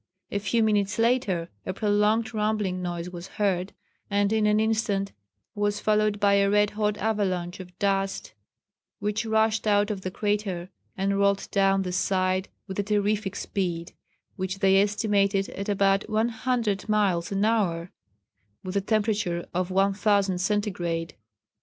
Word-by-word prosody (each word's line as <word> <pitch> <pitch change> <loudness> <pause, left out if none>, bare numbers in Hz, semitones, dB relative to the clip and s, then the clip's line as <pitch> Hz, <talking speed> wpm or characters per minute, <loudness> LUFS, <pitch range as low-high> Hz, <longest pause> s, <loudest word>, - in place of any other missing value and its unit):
A 200 - 0
few 215 +3 +1
minutes 205 -2 +1
later 225 -8 +1 0.2
a 185 - -3
prolonged 210 +3 +1
rumbling 210 -4 -1
noise 175 0 -4
was 175 0 -8
heard, 190 -2 -1 0.4
and 205 +1 +1
in 215 -1 +2
an 210 0 +3
instant 215 -3 0 0.4
was 205 0 -1
followed 215 -1 +1
by 200 -1 +4
a 200 0 +4
red 205 0 +3
hot 210 -1 -1
avalanche 190 -4 -1
of 180 -1 -11
dust, 195 -1 -1 0.6
which 210 +1 -2
rushed 220 0 +2
out 205 0 +3
of 200 -2 -4
the 185 - -3
crater 195 -3 -2 0.3
and 195 +1 0
rolled 200 0 +2
down 195 -1 +3
the 180 - -3
side 185 0 0 0.2
with 190 0 -6
a - - +2
terrific 205 -1 0
speed, 175 -4 -3 0.4
which 190 0 -3
they 195 0 +4
estimated 200 -1 +1
at 200 +1 -5
about 195 0 +2
100 220 -2 0
miles 200 -5 +1
an 195 +1 +1
hour, 180 -6 0 0.7
with 185 +1 -5
a 200 - +2
temperature 205 -4 0
of 180 +1 -1
1000° 195 0 +2
centigrade. 180 -5 -1
200 Hz, 145 wpm, -26 LUFS, 190-210 Hz, 0.7 s, by